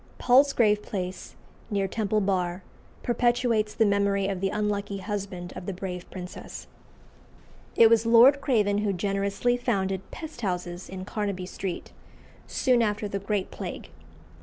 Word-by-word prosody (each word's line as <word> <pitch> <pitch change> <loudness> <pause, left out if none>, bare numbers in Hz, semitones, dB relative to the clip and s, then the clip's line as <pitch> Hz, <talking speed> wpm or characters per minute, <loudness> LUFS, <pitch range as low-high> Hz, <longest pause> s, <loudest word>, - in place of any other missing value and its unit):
Palsgrave 245 -5 +4
Place, 185 -3 -5 0.3
near 200 -3 0
Temple 215 +1 0
Bar, 185 -2 -1 0.4
perpetuates 240 -3 +1
the 225 - +4
memory 200 -1 +2
of 195 -2 -3
the 195 - +1
unlucky 205 -1 -2
husband 195 -3 -5
of 180 - -8
the 195 - -2
brave 180 -1 -6
princess. 180 -1 -8 1.1
It 230 - +8
was 225 -1 +4
Lord 250 +5 +7
Craven 210 -7 +2
who 205 -1 0
generously 200 +5 0
founded 195 -6 -1
pest 315 -6 -8
houses 180 -3 -3
in 185 0 -6
Carnaby 200 -3 -3
Street, 185 -1 -5 0.6
soon 250 -3 +2
after 210 -1 0
the 200 0 -3
Great 200 -1 -2
Plague. - - -7
200 Hz, 135 wpm, -27 LUFS, 190-225 Hz, 1.1 s, It